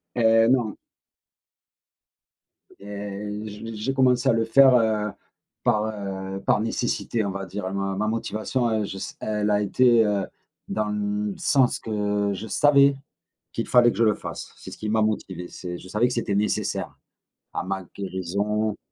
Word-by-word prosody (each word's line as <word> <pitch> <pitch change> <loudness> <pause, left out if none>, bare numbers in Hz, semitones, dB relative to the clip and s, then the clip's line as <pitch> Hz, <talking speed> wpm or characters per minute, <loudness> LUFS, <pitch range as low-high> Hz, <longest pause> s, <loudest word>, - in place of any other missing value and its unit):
Hé! 115 -1 +5
Non. 120 -5 +2 2.0
Et 100 0 -6 0.2
j 105 +2 -8
j'ai 115 +6 -2
commencé 130 -1 +3
à - - +6
le 115 0 +1
faire, 130 +3 +6
heu, 110 -2 +1 0.5
par, 105 0 +3
heu, 95 -2 -5
par - - +3
nécessité, 115 0 -1
on 100 - -1
va 95 0 -5
dire, 95 0 -5
ma 100 0 -2
ma 105 +2 0
motivation, 115 +2 -1
heu, 110 -1 0
je 95 -1 -6
sais, - - -6
elle 105 -1 -1
a 105 0 +3
été, 120 +2 +4
heu, 100 -2 0 0.4
dans 110 -1 -1
le 105 0 -2
sens 130 -3 +3
que 105 -2 -1
je 105 +4 -6
savais 140 +3 +5 0.6
qu'il 115 - -3
fallait 120 -1 +6
que - - -8
je 115 - +4
le 105 -1 +4
fasse. - - -7
C'est - - -10
ce - - -10
qui 110 - -4
m'a 110 +1 +2
motivé, 95 -5 -2
c'est 90 -1 -7
je 95 - -12
savais 105 +6 +2
que 125 - -3
c'était 115 -4 -1
nécessaire 105 +1 -1 0.6
à - - -1
ma 95 0 -3
guérison 100 +3 -2
105 Hz, 170 wpm, -24 LUFS, 100-115 Hz, 2.0 s, à